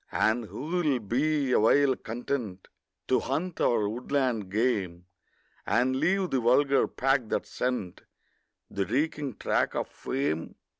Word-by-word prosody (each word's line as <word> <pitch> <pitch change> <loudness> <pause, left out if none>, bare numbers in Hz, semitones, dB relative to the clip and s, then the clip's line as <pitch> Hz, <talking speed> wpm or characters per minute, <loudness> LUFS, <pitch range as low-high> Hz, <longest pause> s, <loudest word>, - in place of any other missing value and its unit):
And 115 +1 +1
who 105 +3 -8
will 155 -3 0
be 135 +5 0
awhile 130 +4 +4
content 115 -5 -5 0.4
To - - +3
hunt 180 +1 -3
our 110 -4 +2
woodland 120 -2 -1
game, 100 -6 -1 0.6
And 130 +2 +1
leave 185 +6 +1
the 135 - +2
vulgar 135 +4 +3
pack 135 -3 0
that - - -1
scent 125 -8 -3 0.7
The 100 -1 -2
reeking 140 0 -1
track - - 0
of - - -1
fame? 130 - -3
125 Hz, 130 wpm, -28 LUFS, 110-140 Hz, 0.7 s, awhile